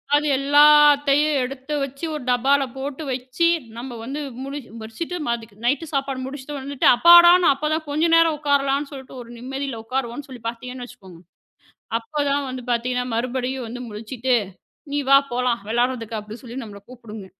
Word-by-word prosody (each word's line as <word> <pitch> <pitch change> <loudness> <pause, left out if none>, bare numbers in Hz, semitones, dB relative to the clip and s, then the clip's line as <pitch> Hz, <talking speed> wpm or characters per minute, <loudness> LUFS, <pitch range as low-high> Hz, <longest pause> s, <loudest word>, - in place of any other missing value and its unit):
அது 295 +1 +2
எல்லாத்தையும் 290 +1 +5
எடுத்து 265 +3 -6
வச்சு 275 +4 -5
ஒரு 295 - -6
டப்பாவுல 270 +3 +3
போட்டு 280 +3 -5
வச்சி 255 +5 -1 0.3
நம்ம 250 +2 -7
வந்து 270 +6 -5 0.2
முடி 275 +2 -5 0.2
முடிச்சுட்டு 225 +11 -6
மறுபடிக்கும் 225 -3 -4
நைட் 285 +7 +1
சாப்பாடு 275 -1 -2
முடிச்சுட்டு 280 +2 -7
வந்துட்டா, 275 0 +1
அப்பாடா. 345 +4 +9 0.2
அப்பத்தான் 305 +3 -2
கொஞ்சம் 320 +3 +1
நேரம் 330 -1 +4
உக்காரலாம்னு 280 -1 +1
சொல்லிட்டு 265 -2 -10
ஒரு 235 - -12
நிம்மதியில 265 0 -5
உக்காருவோம்னு 255 +3 -4
சொல்லிப் 240 -3 -8
பாத்தீங்கன்னு 250 +2 -8
வச்சுக்கோங்க. 190 -7 -15 0.8
அப்பத்தான் 285 +2 -1
வந்து 255 0 -6
பாத்தீங்கன்னா, 250 +1 -1
மறுபடியும் 255 +1 -2
வந்து 245 +2 -7
முழிச்சிட்டு 230 +4 -3 0.6
"நீ 290 - +1
வா, 275 - +8
போலாம் 245 -2 0
வெளாடுறதுக்கு," 235 -1 -1
அப்படிச் 210 +2 -10
சொல்லி 240 0 -9
நம்மள 205 -2 -10
கூப்புடுங்க. 220 -5 -10
265 Hz, 150 wpm, -22 LUFS, 240-285 Hz, 0.8 s, அப்பாடா